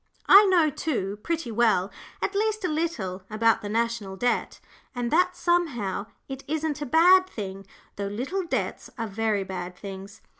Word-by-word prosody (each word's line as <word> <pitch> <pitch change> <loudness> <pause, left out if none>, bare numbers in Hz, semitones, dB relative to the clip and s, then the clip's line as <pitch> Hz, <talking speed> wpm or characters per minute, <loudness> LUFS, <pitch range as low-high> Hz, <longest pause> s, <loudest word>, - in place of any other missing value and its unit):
I 405 +2 +9
know, 340 -5 +4
too, 210 -10 -3
pretty 330 -5 -3
well 215 -4 +2 0.3
at 395 - -1
least 430 0 0
a - - +2
little 300 - -2
about 225 +1 +2
the 205 - -5
National 225 -3 -1
Debt, 245 +5 -1 0.4
and 245 -1 -2
that 360 +2 +3
somehow 255 - 0 0.2
it 270 0 -7
isn't 305 0 -2
a 290 - -3
bad 360 +6 +6
thing, 195 - -7 0.3
though 200 0 -2
little 265 - -3
debts 345 - -3
are 230 - -2
very 215 -1 -1
bad 180 -1 -6
things. 195 +2 -9
235 Hz, 160 wpm, -26 LUFS, 200-330 Hz, 0.4 s, I